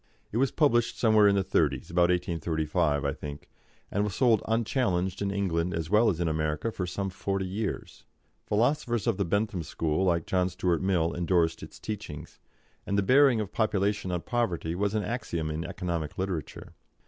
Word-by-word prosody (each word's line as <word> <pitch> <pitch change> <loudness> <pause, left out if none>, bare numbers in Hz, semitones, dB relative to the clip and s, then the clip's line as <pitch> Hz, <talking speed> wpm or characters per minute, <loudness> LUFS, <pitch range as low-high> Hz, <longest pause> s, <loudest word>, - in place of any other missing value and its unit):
It 110 - -2
was 135 +2 +3
published 120 -7 +2
somewhere 110 -3 +5
in 100 - +4
the 100 - +2
Thirties - - 0
about 85 0 +3
1835, 80 -3 0
I 70 - 0
think 75 -1 -8 0.4
and 100 - +1
was 105 -3 -2
sold 115 -5 +4
unchallenged 110 -6 0
in 100 - 0
England 90 -3 -1
as 80 +1 -4
well 110 +2 +5
as 90 -5 -1
in 85 - 0
America 75 +5 -1
for 95 -4 -4
some 95 +2 -3
forty 95 +1 -2
years. 100 +3 -4 0.4
Philosophers 120 +1 +1
of 115 -5 +1
the 100 - 0
Bentham 100 +1 0
school, 80 +2 -1
like 85 -3 +1
John 90 -1 +1
Stuart 90 -1 0
Mill, 90 -4 +1
endorsed 85 -1 +1
its - - -10
teachings, 100 -9 -7 0.5
and 100 - 0
the 100 - +3
bearing 130 +2 +5
of 105 -4 -3
population 105 -3 0
on 90 -1 -1
poverty 90 -10 -1
was 100 +3 -1
an 105 - 0
axiom 85 -9 -3
in 80 +2 -3
economic 85 -3 -4
literature. 95 -5 -4
95 Hz, 180 wpm, -28 LUFS, 85-105 Hz, 0.5 s, somewhere